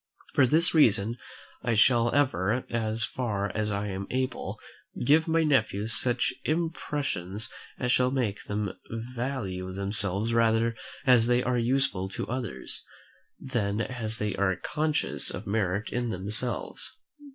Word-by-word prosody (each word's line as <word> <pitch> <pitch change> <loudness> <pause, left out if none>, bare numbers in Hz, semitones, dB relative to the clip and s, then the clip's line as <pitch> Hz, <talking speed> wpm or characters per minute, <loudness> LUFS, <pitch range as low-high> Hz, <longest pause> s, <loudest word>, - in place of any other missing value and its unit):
For 130 - +5
this 165 +6 +3
reason 115 -6 +3 0.4
I 115 -2 0
shall 120 +1 +4
ever, 125 -5 +1
as 110 -1 -1
far 105 -5 -2
as 110 0 0
I 100 0 -2
am 95 0 -5
able, 130 0 -3 0.5
give 155 +5 +4
my 165 0 +2
nephews 110 -7 +2
such 125 0 +5
impressions 145 - -2 0.2
as 125 -1 0
shall 125 0 +3
make 125 -6 -2
them 105 -1 -2 0.2
value 115 -5 -4
themselves 100 +2 0
rather 115 0 +2 0.3
as 125 -3 +5
they 125 0 +3
are 125 0 +1
useful 120 -6 +2
to - - -4
others, 120 - -2 0.6
than 110 -6 -2
as 115 -2 -2
they 105 -1 -2
are 95 -2 +2
conscious 150 - -1
of - - -5
merit 100 0 -1
in 120 -1 -2
themselves. 110 +5 -2
115 Hz, 135 wpm, -28 LUFS, 100-130 Hz, 0.6 s, For